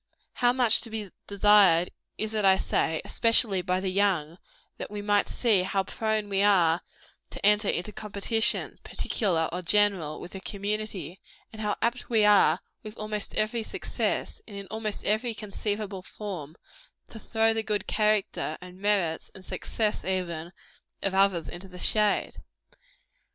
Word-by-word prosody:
How 245 Hz, 0 st, +3 dB
much 245 Hz, -3 st, +4 dB
to 235 Hz, -, -3 dB
be 215 Hz, -4 st, -6 dB, 0.2 s
desired 200 Hz, -4 st, +5 dB, 0.3 s
is 220 Hz, 0 st, -2 dB
it, 215 Hz, -1 st, 0 dB
I 190 Hz, -1 st, +6 dB
say, 160 Hz, -3 st, 0 dB
especially 225 Hz, -4 st, +3 dB
by 185 Hz, 0 st, 0 dB
the 190 Hz, 0 st, -2 dB
young, 185 Hz, -4 st, 0 dB, 0.4 s
that -, -, -6 dB
we 210 Hz, 0 st, -6 dB
might 205 Hz, 0 st, +2 dB
see 220 Hz, -6 st, +2 dB
how 190 Hz, +1 st, 0 dB
prone 220 Hz, +1 st, -2 dB
we 195 Hz, -1 st, 0 dB
are 180 Hz, -5 st, +4 dB, 0.5 s
to -, -, -5 dB
enter 210 Hz, 0 st, +4 dB
into 180 Hz, +5 st, -1 dB
competition, 210 Hz, +2 st, 0 dB
particular 170 Hz, -8 st, 0 dB
or 180 Hz, +2 st, -3 dB
general, 190 Hz, -4 st, +2 dB
with 175 Hz, -, -9 dB
the 190 Hz, -, -8 dB
community; 200 Hz, -4 st, -4 dB, 0.3 s
and 220 Hz, -, -8 dB
how 210 Hz, -1 st, 0 dB
apt 235 Hz, +1 st, -1 dB
we 220 Hz, -3 st, +4 dB
are, 195 Hz, -5 st, +5 dB, 0.2 s
with 215 Hz, 0 st, -10 dB
almost 215 Hz, -1 st, -4 dB
every 220 Hz, +2 st, 0 dB, 0.3 s
breath, -, -, -1 dB
and 205 Hz, -3 st, -9 dB
in 200 Hz, -, -6 dB
almost 220 Hz, -1 st, -4 dB
every 220 Hz, +3 st, 0 dB
conceivable 205 Hz, -2 st, -4 dB
form, 180 Hz, -7 st, -7 dB, 0.5 s
to 220 Hz, -, -10 dB
throw 225 Hz, 0 st, +1 dB
the 225 Hz, -, 0 dB
good 210 Hz, -2 st, -2 dB
character, 210 Hz, -7 st, 0 dB
and 180 Hz, 0 st, -12 dB
merits, 195 Hz, -6 st, 0 dB
and 185 Hz, -, -11 dB
success, 215 Hz, +3 st, -2 dB
even, 175 Hz, -3 st, -3 dB, 0.5 s
of 195 Hz, -, 0 dB
others 190 Hz, -3 st, +2 dB
into 175 Hz, +2 st, -8 dB
the 180 Hz, -1 st, -12 dB
shade. 210 Hz, +2 st, +1 dB
205 Hz, 155 wpm, -27 LUFS, 185-215 Hz, 0.5 s, I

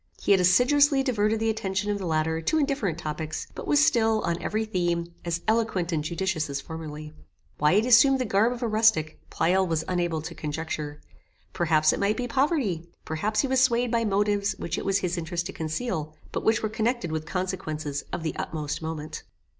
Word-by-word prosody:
He -, -, 0 dB
had 195 Hz, -2 st, +6 dB
assiduously 270 Hz, +9 st, +4 dB
diverted 220 Hz, -4 st, +1 dB
the 225 Hz, 0 st, +1 dB
attention 205 Hz, -1 st, -2 dB
of 205 Hz, -, -2 dB
the 190 Hz, -, -4 dB
latter 160 Hz, 0 st, 0 dB
to 315 Hz, -, +1 dB
indifferent 275 Hz, -, 0 dB
topics, 155 Hz, -1 st, -4 dB
but -, -, -7 dB
was 295 Hz, +1 st, +5 dB
still, 225 Hz, -8 st, +3 dB
on 170 Hz, -2 st, -2 dB
every 220 Hz, +1 st, -1 dB
theme, 175 Hz, -4 st, -1 dB
as 170 Hz, 0 st, -2 dB
eloquent 220 Hz, -6 st, +1 dB
and 155 Hz, -3 st, 0 dB
judicious 170 Hz, -1 st, -2 dB
as 140 Hz, 0 st, -2 dB
formerly. 155 Hz, 0 st, -8 dB, 0.5 s
Why 150 Hz, +2 st, +4 dB
he 205 Hz, -, +5 dB
had -, -, -3 dB
assumed 255 Hz, +3 st, +6 dB
the 255 Hz, -, -1 dB
garb 210 Hz, +3 st, +3 dB
of 245 Hz, 0 st, -5 dB
a -, -, +1 dB
rustic, 215 Hz, -8 st, +2 dB
Pleyel 190 Hz, +2 st, +2 dB
was 160 Hz, -1 st, 0 dB
unable 175 Hz, -3 st, -1 dB
to 170 Hz, +1 st, -6 dB
conjecture. 150 Hz, -1 st, -5 dB, 0.5 s
Perhaps 155 Hz, -2 st, +3 dB
it -, -, -3 dB
might 205 Hz, +2 st, +1 dB
be 250 Hz, -, -2 dB
poverty, 245 Hz, -, 0 dB, 0.2 s
perhaps 205 Hz, +8 st, 0 dB
he 275 Hz, -, -1 dB
was 260 Hz, -1 st, +2 dB
swayed 240 Hz, -2 st, +2 dB
by 230 Hz, -1 st, +2 dB
motives 205 Hz, 0 st, +1 dB
which 170 Hz, -, -4 dB
it -, -, -5 dB
was 195 Hz, 0 st, +2 dB
his 180 Hz, -3 st, -2 dB
interest 170 Hz, +1 st, -3 dB
to 195 Hz, -, -5 dB
conceal, 160 Hz, -1 st, -3 dB, 0.2 s
but -, -, -3 dB
which 220 Hz, 0 st, +2 dB
were -, -, +2 dB
connected 225 Hz, -3 st, -1 dB
with 155 Hz, 0 st, -3 dB
consequences 155 Hz, -6 st, -3 dB
of 170 Hz, -, -4 dB
the 160 Hz, -, -2 dB
utmost 150 Hz, -1 st, -4 dB
moment. 160 Hz, -1 st, -5 dB
185 Hz, 200 wpm, -26 LUFS, 160-225 Hz, 0.5 s, had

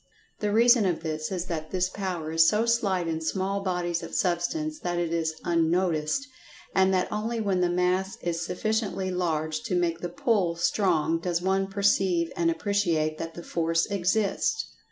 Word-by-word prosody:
The 210 Hz, -1 st, -1 dB
reason 235 Hz, -1 st, +5 dB
of 175 Hz, -3 st, -1 dB
this 155 Hz, 0 st, -3 dB
is 180 Hz, -2 st, -2 dB
that 160 Hz, -3 st, -4 dB
this 185 Hz, -1 st, 0 dB
power 180 Hz, -5 st, -4 dB
is 160 Hz, 0 st, +5 dB
so 215 Hz, +2 st, +1 dB
slight 200 Hz, -7 st, +1 dB
in 160 Hz, -1 st, -2 dB
small 190 Hz, +4 st, -1 dB
bodies 180 Hz, -2 st, -1 dB
of 165 Hz, -, -7 dB
Substance 305 Hz, -, -1 dB
that 175 Hz, -7 st, -2 dB
it 170 Hz, -1 st, -1 dB
is 160 Hz, -1 st, -1 dB
unnoticed; 170 Hz, -, +1 dB, 0.5 s
and 190 Hz, 0 st, +4 dB
that 185 Hz, -1 st, 0 dB
only 225 Hz, +2 st, -2 dB
when 195 Hz, -4 st, 0 dB
the 180 Hz, -, +2 dB
mass 180 Hz, +2 st, 0 dB
is 170 Hz, -1 st, -2 dB
sufficiently 195 Hz, 0 st, -1 dB
large 160 Hz, -1 st, -1 dB
to 230 Hz, -6 st, -2 dB
make 170 Hz, -2 st, 0 dB
the 175 Hz, -, -4 dB
"pull" 180 Hz, -2 st, +1 dB
strong 170 Hz, -2 st, +1 dB
does 170 Hz, 0 st, -1 dB
one 190 Hz, +2 st, +1 dB
perceive 195 Hz, -4 st, +1 dB
and 170 Hz, -1 st, +2 dB
appreciate 165 Hz, -4 st, 0 dB
that 165 Hz, 0 st, -5 dB
the 170 Hz, -, -8 dB
force 165 Hz, 0 st, 0 dB
exists. 200 Hz, -, 0 dB
180 Hz, 175 wpm, -27 LUFS, 165-200 Hz, 0.5 s, reason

